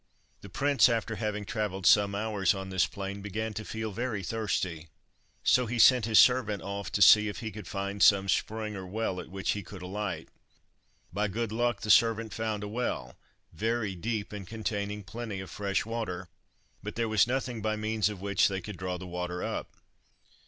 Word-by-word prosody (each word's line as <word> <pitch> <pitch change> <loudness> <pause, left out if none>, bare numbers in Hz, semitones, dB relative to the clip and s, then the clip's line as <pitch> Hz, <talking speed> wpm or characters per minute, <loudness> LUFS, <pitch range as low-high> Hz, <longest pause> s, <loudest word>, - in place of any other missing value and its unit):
The 100 - -10
prince, 140 +7 +4
after 115 -2 -1
having 105 -1 -3
travelled 105 -3 -3
some 100 -1 +5
hours 100 -4 +1
on 95 0 -6
this 95 -1 +2
plain, 100 0 -6
began 110 +2 -3
to 110 - -5
feel 110 0 -4
very 110 -1 -3
thirsty, 95 -6 -2 0.6
so 125 -1 +4
he 120 +2 -3
sent 125 -1 +6
his 110 -1 +3
servant 120 -5 +5
off 100 +1 -5
to 100 - +5
see 105 +2 +8
if 105 - -5
he 110 -1 -4
could 105 -1 -9
find 100 0 -4
some 100 -1 +6
spring 110 +2 -1
or 95 -1 -6
well 95 -1 -2
at - - -8
which 95 0 -2
he 105 - -2
could 95 0 -10
alight. 100 +1 -4 0.8
By 105 +2 0
good 115 +2 -3
luck 120 -1 0
the 105 - +1
servant 115 0 +4
found 110 -2 -2
a - - -4
well, 105 - -3 0.4
very 110 +2 -1
deep, 105 +3 -3
and 100 -3 -7
containing 105 -1 -3
plenty 110 0 -6
of 95 - -8
fresh 100 -1 -1
water, 95 -6 -4 0.5
but 105 +1 -6
there 115 0 0
was 110 0 +3
nothing 125 -2 -2
by 110 0 0
means 110 0 0
of 100 -3 -7
which 100 -1 +3
they 95 -1 -2
could 100 0 -8
draw 90 0 -3
the 95 - -8
water 90 0 -4
up. - - -4
105 Hz, 195 wpm, -29 LUFS, 95-110 Hz, 0.8 s, see